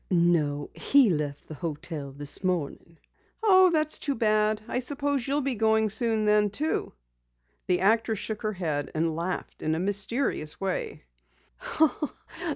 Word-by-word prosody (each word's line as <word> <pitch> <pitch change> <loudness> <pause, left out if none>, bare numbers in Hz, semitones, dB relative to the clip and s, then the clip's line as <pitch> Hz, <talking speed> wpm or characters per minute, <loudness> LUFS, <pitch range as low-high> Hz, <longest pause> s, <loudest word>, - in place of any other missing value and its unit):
"No, 170 -5 +1
he 275 -7 +4
left 150 -3 -3
the - - -8
hotel 155 -2 -5
this 145 +6 -4
morning." 170 -2 -3 0.5
"Oh, 375 -3 +6
that's 310 -2 +1
too 280 -2 -1
bad. 215 -1 +2
I - - -1
suppose 280 0 -2
you'll 285 +2 +1
be 270 -1 -1
going 220 -1 +2
soon, 220 0 +2
then?" 210 0 +3 1.2
The 180 0 +1
actress 220 +2 +2
shook 215 +2 -4
her 215 -1 -2
head, 155 -6 -2
and 160 0 0
laughed 175 +2 -4
in 155 0 0
a - - -2
mysterious 200 - 0
way. 190 - -3
205 Hz, 140 wpm, -27 LUFS, 165-230 Hz, 1.2 s, Oh